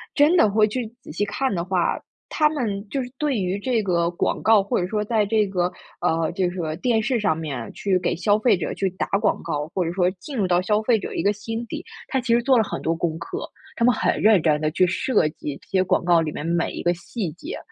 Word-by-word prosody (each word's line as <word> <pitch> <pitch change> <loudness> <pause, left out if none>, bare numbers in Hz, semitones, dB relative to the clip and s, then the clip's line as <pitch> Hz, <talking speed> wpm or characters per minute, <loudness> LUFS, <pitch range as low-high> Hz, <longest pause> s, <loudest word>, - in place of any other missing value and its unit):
真 300 +4 +5
的 215 - +5
会 215 +1 +4
去 235 +1 -3
仔 - - -10
细 205 +6 -1
看 210 +4 -1
的 170 -2 -1
话， 185 -2 0 0.3
它 305 -1 +3
们 215 -9 -3
就 270 -2 -2
是 245 - -9
对 295 -4 0
于 190 +1 -1
这 230 -1 0
个 170 -2 +1
广 175 - -1
告， 215 -3 +5
或 200 - 0
者 180 - -1
说 210 +1 -1
在 215 -1 +1
这 215 0 +2
个， 180 -2 0 0.3
呃， 165 -2 +1
就 180 0 0
是 180 - -8
说， 160 -3 -3
电 225 +2 +1
视 240 0 0
上 160 -6 +1
面 140 -8 -5
去 190 -2 0
给 - - -1
消 205 +4 +2
费 220 -4 +3
者 - - -3
去 195 - -1
打 185 - -3
广 - - +1
告， 150 -2 -2
或 180 -3 0
者 165 - -2
说 180 -1 +2
进 205 +10 -9
入 195 -3 +1
到 175 0 +3
消 210 +2 +1
费 225 0 +3
者 - - -6
一 - - -1
个 205 - +3
心 225 +3 -5
底， - - -6 0.2
它 265 - 0
其 240 -2 0
实 240 - +4
做 260 0 +4
了 220 - +4
很 - - -5
多 165 +1 0
功 165 -1 -2
课， 375 - -5 0.3
它 235 - +1
们 250 - +5
很 - - 0
认 210 -5 +5
真 150 -2 +2
地 155 0 0
去 180 +2 +3
设 180 -3 +1
计， 150 -2 -6
这 - - -22
些 190 -2 +2
广 185 -1 +1
告 175 -1 +4
里 155 -2 -2
面 150 - -6
每 170 0 0
一 - - -5
个 175 0 +3
细 175 0 -5
节。 300 - -7
195 Hz, 285 characters per minute, -23 LUFS, 175-225 Hz, 0.3 s, 真